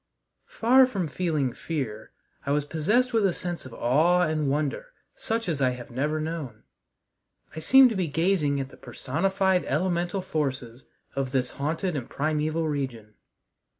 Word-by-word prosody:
Far 255 +3 +4
from 195 -9 -2
feeling 150 -5 -1
fear, 125 -10 -5 0.3
I - - -5
was 145 0 0
possessed 210 - +1
with 225 -2 +3
a 190 -3 +3
sense 175 -6 -5
of 125 - -12
awe 160 +9 +3
and 155 -3 0
wonder 150 - -2 0.2
such 230 - -3
as 155 -5 -1
I 130 -1 +2
have 120 - -10
never 150 +5 -1
known. 155 -8 -5 0.9
I - - -4
seemed 260 +8 +6
to - - -2
be 185 -3 0
gazing 155 -2 +1
at 135 -1 -4
the - - -15
personified 190 +6 0
elemental 175 +4 -1
forces 130 -7 -3 0.3
of 135 -2 -2
this 130 -2 0
haunted 160 +5 -2
and 130 -5 -4
primeval 155 +2 -1
region. 130 -8 -4
155 Hz, 155 wpm, -26 LUFS, 135-180 Hz, 0.9 s, seemed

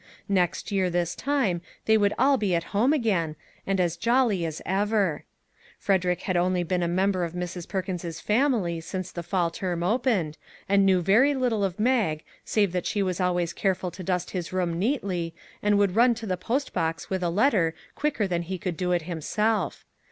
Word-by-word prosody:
Next 185 +1 0
year 190 -2 +1
this 175 -1 0
time 260 -12 0 0.2
they 220 - +5
would 205 -1 +2
all 275 +1 +4
be 205 -8 +1
at 170 - 0
home 230 +7 +3
again, 195 - +1 0.3
and 195 -1 +1
as 175 -2 +1
jolly 230 -3 +2
as 155 -1 -5
ever. 200 -4 0 0.5
Frederick 180 -3 +1
had 185 - -1
only 180 0 +2
been 180 +1 -1
a 170 - +1
mem 190 +3 +2
ber 185 -2 -1
of 170 -1 -3
Mrs. 180 -1 -5
Perkins's 180 -4 -4
family 210 - +1
since 185 +2 -5
the 170 - -5
fall 170 0 0
term 175 -1 -3
opened, 205 - 0 0.3
and 195 0 +4
knew 185 -2 +3
very 245 - +4
little 245 -5 0
of 190 -1 -2
Mag 215 -10 +1 0.2
save 205 -4 +1
that 180 -1 -2
she 205 - 0
was 185 -1 -2
always 175 -2 0
careful 185 -2 -1
to 185 - -9
dust 180 0 -2
his 180 -3 -4
room 175 -2 -1
neatly, 185 - -1 0.3
and 205 0 +3
would 200 -2 +2
run 240 +1 +5
to 225 0 -7
the 185 -3 -1
post 245 +10 -2
box 165 -1 -2
with 190 -1 -1
a 175 - +1
letter 185 - +2 0.2
quicker 290 -8 0
than 175 -2 -1
he 185 +2 -4
could 180 -1 -3
do 180 -1 -1
it 175 -2 +1
himself. 180 +3 -1
185 Hz, 195 wpm, -26 LUFS, 175-210 Hz, 0.5 s, they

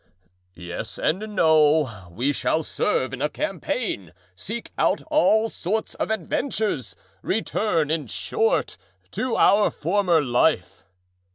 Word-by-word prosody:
"Yes 90 +5 -7
and 170 - 0 0.2
no. 150 - +3
We 125 +11 -1
shall 160 +3 0
serve 130 -2 -1
in 135 - -5
a 150 - +1
campaign, 250 - -3 0.2
seek 220 - -6
out - - +1
all 225 -8 +4
sorts 220 +1 -3
of - - -3
adventures—return, 170 - -2
in 160 -2 -1
short, 455 +3 -1 0.3
to 255 -2 -2
our 205 +2 +5
former 175 +1 +1
life." 125 - +1
160 Hz, 110 wpm, -24 LUFS, 130-220 Hz, 0.3 s, our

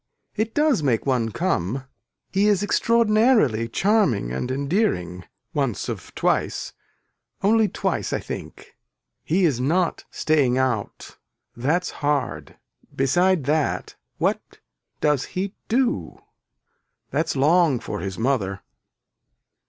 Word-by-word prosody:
It 220 +1 -2
does 300 - +3
make 125 -6 +1
one 125 -4 +1
come, 130 - -1 0.5
he 200 +2 +2
is 205 -2 +3
extraordinarily 215 - +3
charming 190 - +2
and 65 - -3
endearing 130 - -1 0.3
once - - -1
of - - -6
twice - - 0 0.7
only 220 +2 +4
twice - - -2
I - - 0
think. - - -8 0.5
He 180 +4 +2
is 140 -7 +1
not 165 +7 0
staying 140 -5 +1
out 125 -6 -2 0.4
that's 150 +9 0
hard 145 -4 -1 0.4
beside 175 +5 +2
that 150 +2 -1 0.2
what - - +1 0.6
does 150 -3 +2
he 195 +1 -2
do. 230 - 0 0.9
That's 150 +3 0
long 150 -1 +3
for 105 -3 -5
his 95 -1 -5
mother. 110 -6 -1
145 Hz, 110 wpm, -23 LUFS, 120-195 Hz, 0.9 s, only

